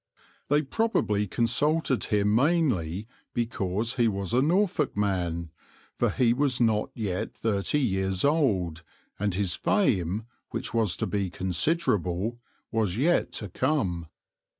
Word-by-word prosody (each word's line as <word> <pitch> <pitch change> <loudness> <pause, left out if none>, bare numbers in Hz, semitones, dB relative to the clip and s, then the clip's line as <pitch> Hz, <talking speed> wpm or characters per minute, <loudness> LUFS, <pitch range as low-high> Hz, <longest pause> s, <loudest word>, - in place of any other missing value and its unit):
They 145 +2 +3
probably 135 - 0
consulted 130 - +1
him 105 0 +2
mainly 115 - +1 0.3
because 115 -1 -1
he 120 -2 +4
was 100 0 -2
a 125 - +4
Norfolk 170 - +1
man, 90 -5 -1 0.4
for - - +1
he 120 -2 +2
was 135 -1 +1
not 110 -3 +2
yet 100 -5 -3
thirty 110 +6 0
years 95 -5 0
old, 100 - +1 0.4
and 100 -2 0
his 95 -3 0
fame, 105 - +1 0.2
which - - -4
was 110 -6 +1
to - - -1
be 100 -2 -1
considerable, 95 - 0 0.3
was 110 -4 0
yet 165 +7 +2
to 105 - -4
come. 95 - -1
110 Hz, 125 wpm, -27 LUFS, 95-135 Hz, 0.4 s, he